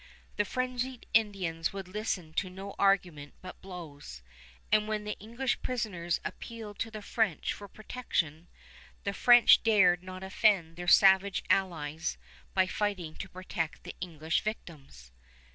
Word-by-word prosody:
The 210 Hz, -, +2 dB
frenzied 255 Hz, +2 st, -3 dB
Indians 190 Hz, -7 st, +1 dB
would 195 Hz, -2 st, -6 dB
listen 185 Hz, -5 st, -3 dB
to 185 Hz, +3 st, -1 dB
no 195 Hz, +2 st, -8 dB
argument 180 Hz, -7 st, +1 dB
but 185 Hz, -, -10 dB
blows; 150 Hz, -, -9 dB, 0.5 s
and 215 Hz, 0 st, +4 dB
when 215 Hz, -1 st, -2 dB
the 210 Hz, 0 st, -4 dB
English 235 Hz, +5 st, -2 dB
prisoners 190 Hz, -9 st, -2 dB
appealed 220 Hz, -3 st, -7 dB
to 225 Hz, -, -2 dB
the 215 Hz, -1 st, -8 dB
French 205 Hz, -7 st, 0 dB
for 205 Hz, -, -10 dB
protection, 175 Hz, -8 st, -3 dB, 0.6 s
the 200 Hz, -, -2 dB
French 240 Hz, +3 st, +7 dB
dared 195 Hz, -6 st, +4 dB
not 185 Hz, 0 st, -8 dB
offend 190 Hz, -4 st, +2 dB
their 175 Hz, +1 st, -7 dB
savage 195 Hz, +1 st, +5 dB
allies 160 Hz, -4 st, 0 dB, 0.4 s
by 190 Hz, -1 st, +5 dB
fighting 185 Hz, -5 st, -2 dB
to -, -, -6 dB
protect 165 Hz, -4 st, -4 dB
the -, -, -7 dB
English 160 Hz, -2 st, -1 dB
victims. 140 Hz, -, -7 dB
190 Hz, 140 wpm, -30 LUFS, 170-215 Hz, 0.6 s, French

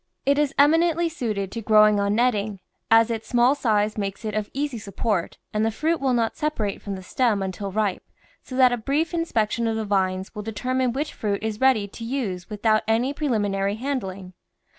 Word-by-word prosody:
It 280 Hz, +1 st, +3 dB
is 295 Hz, -2 st, +2 dB
eminently 330 Hz, +3 st, +4 dB
suited 215 Hz, -, -3 dB
to 230 Hz, -, -5 dB
growing 215 Hz, -1 st, +5 dB
on 200 Hz, +1 st, +1 dB
netting, 215 Hz, -4 st, +1 dB, 0.3 s
as 225 Hz, +1 st, +5 dB
its 225 Hz, -1 st, -4 dB
small 245 Hz, +2 st, +4 dB
size 215 Hz, -6 st, 0 dB
makes 200 Hz, +2 st, -4 dB
it 215 Hz, -, -3 dB
of 215 Hz, 0 st, -2 dB
easy 280 Hz, -3 st, -3 dB
support 200 Hz, -2 st, -2 dB, 0.2 s
and 215 Hz, 0 st, +1 dB
the 225 Hz, -, +2 dB
fruit 315 Hz, +9 st, -1 dB
will 265 Hz, -2 st, +2 dB
not 230 Hz, -1 st, 0 dB
separate 225 Hz, -10 st, -2 dB
from 200 Hz, -1 st, -5 dB
the 190 Hz, -, -9 dB
stem 215 Hz, 0 st, +1 dB
until 190 Hz, +1 st, -4 dB
ripe, 210 Hz, -1 st, 0 dB, 0.4 s
so 255 Hz, -, -9 dB
that 255 Hz, -1 st, +5 dB
a -, -, 0 dB
brief 290 Hz, +9 st, -1 dB
inspection 235 Hz, -9 st, 0 dB
of 225 Hz, -, 0 dB
the 220 Hz, -1 st, -2 dB
vines 190 Hz, -2 st, -1 dB
will 210 Hz, -, -5 dB
determine 250 Hz, +4 st, -1 dB
which 285 Hz, +5 st, -3 dB
fruit 205 Hz, -1 st, -2 dB
is 220 Hz, 0 st, -3 dB
ready 255 Hz, -6 st, +3 dB
to 230 Hz, -, -9 dB
use 225 Hz, -8 st, -3 dB
without 215 Hz, +1 st, +2 dB
any 235 Hz, +5 st, +1 dB
preliminary 205 Hz, -8 st, 0 dB
handling. 195 Hz, -8 st, -4 dB
220 Hz, 195 wpm, -24 LUFS, 205-260 Hz, 0.4 s, growing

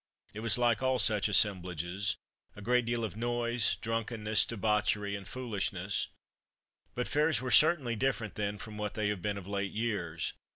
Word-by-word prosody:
It 105 Hz, -, -6 dB
was 110 Hz, -1 st, +1 dB
like 120 Hz, -3 st, +2 dB
all 130 Hz, 0 st, +2 dB
such 105 Hz, -2 st, +2 dB
assemblages 95 Hz, -2 st, +1 dB, 0.4 s
a 105 Hz, -, -10 dB
great 125 Hz, +2 st, +3 dB
deal 120 Hz, 0 st, -1 dB
of 110 Hz, -, -3 dB
noise, 120 Hz, 0 st, +1 dB
drunkenness, 115 Hz, -1 st, 0 dB
debauchery, 105 Hz, -2 st, +1 dB
and 100 Hz, -1 st, -7 dB
foolishness. 100 Hz, -6 st, -2 dB, 0.9 s
But 125 Hz, -, -1 dB
fairs 150 Hz, -2 st, +2 dB
were 130 Hz, 0 st, -3 dB
certainly 150 Hz, -7 st, +5 dB
different 120 Hz, -3 st, -1 dB
then 105 Hz, 0 st, -2 dB
from 105 Hz, 0 st, -8 dB
what 105 Hz, -1 st, -3 dB
they 105 Hz, -1 st, 0 dB
have 105 Hz, -3 st, -2 dB
been 100 Hz, +1 st, -1 dB
of 100 Hz, -, -7 dB
late 100 Hz, 0 st, -3 dB
years. 100 Hz, -8 st, -2 dB
110 Hz, 165 wpm, -31 LUFS, 100-120 Hz, 0.9 s, certainly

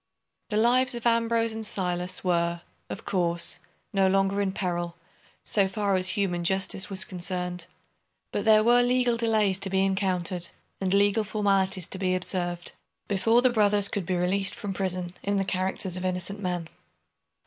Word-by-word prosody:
The 210 Hz, -, 0 dB
lives 250 Hz, +3 st, +3 dB
of 235 Hz, -, -7 dB
Ambrose 230 Hz, -1 st, +2 dB
and 220 Hz, 0 st, -5 dB
Silas 180 Hz, -3 st, -1 dB
were, 170 Hz, -1 st, 0 dB, 0.3 s
of -, -, -7 dB
course, 170 Hz, -2 st, +1 dB, 0.3 s
no 195 Hz, -1 st, +3 dB
longer 195 Hz, +1 st, +1 dB
in 195 Hz, -1 st, 0 dB
peril, 175 Hz, -3 st, -3 dB, 0.5 s
so 200 Hz, -2 st, +2 dB
far 200 Hz, 0 st, -1 dB
as 185 Hz, +1 st, +1 dB
human 175 Hz, -4 st, 0 dB
justice 190 Hz, +2 st, +1 dB
was 190 Hz, -1 st, +3 dB
concerned. 180 Hz, -1 st, -3 dB, 0.6 s
But -, -, -2 dB
there 215 Hz, -1 st, +5 dB
were 240 Hz, +2 st, +5 dB
legal 245 Hz, -1 st, +2 dB
delays 215 Hz, -4 st, +1 dB
to 195 Hz, -, -1 dB
be 190 Hz, 0 st, +2 dB
encountered, 185 Hz, -3 st, -1 dB, 0.3 s
and 190 Hz, -1 st, -1 dB
legal 205 Hz, +2 st, +3 dB
formalities 195 Hz, -3 st, +1 dB
to 190 Hz, -, -5 dB
be 185 Hz, -1 st, +1 dB
observed, 175 Hz, -1 st, -2 dB, 0.4 s
before 225 Hz, +5 st, +2 dB
the 255 Hz, -, +4 dB
brothers 205 Hz, -3 st, +2 dB
could 195 Hz, -4 st, -3 dB
be 185 Hz, -, 0 dB
released 190 Hz, +2 st, +1 dB
from 205 Hz, -2 st, -5 dB
prison 180 Hz, -2 st, -3 dB
in 200 Hz, 0 st, -1 dB
the 195 Hz, -, 0 dB
characters 185 Hz, -1 st, -2 dB
of 180 Hz, -, -5 dB
innocent 185 Hz, +2 st, -1 dB
men. 180 Hz, -4 st, -3 dB
195 Hz, 165 wpm, -26 LUFS, 180-210 Hz, 0.6 s, there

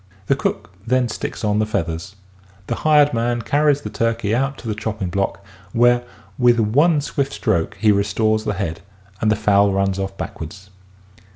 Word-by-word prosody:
The -, -, +2 dB
cook 85 Hz, -, -3 dB
then 125 Hz, +1 st, +1 dB
sticks 105 Hz, -, -5 dB
on 105 Hz, 0 st, +1 dB
the 110 Hz, -, +2 dB
feathers. 90 Hz, -1 st, -3 dB, 0.5 s
The -, -, -2 dB
hired 150 Hz, -2 st, +4 dB
man 120 Hz, 0 st, 0 dB
carries 145 Hz, -1 st, +2 dB
the 105 Hz, -, -6 dB
turkey 115 Hz, -1 st, 0 dB
out 135 Hz, +3 st, 0 dB
to -, -, -9 dB
the 110 Hz, -, 0 dB
chopping 105 Hz, -3 st, -4 dB
block 100 Hz, +1 st, -2 dB, 0.3 s
where 120 Hz, +1 st, +4 dB, 0.4 s
with 120 Hz, -1 st, +4 dB
one 145 Hz, +9 st, +3 dB
swift 140 Hz, -1 st, -2 dB
stroke 95 Hz, -8 st, -1 dB
he 110 Hz, -1 st, +4 dB
restores 110 Hz, +2 st, +1 dB
the 105 Hz, -, -2 dB
head 85 Hz, -5 st, -3 dB, 0.4 s
and 110 Hz, -, +2 dB
the 110 Hz, -, +3 dB
fowl 100 Hz, -1 st, +3 dB
runs 95 Hz, 0 st, 0 dB
off 95 Hz, 0 st, -4 dB
backwards. 95 Hz, +4 st, -7 dB
110 Hz, 175 wpm, -20 LUFS, 100-120 Hz, 0.5 s, hired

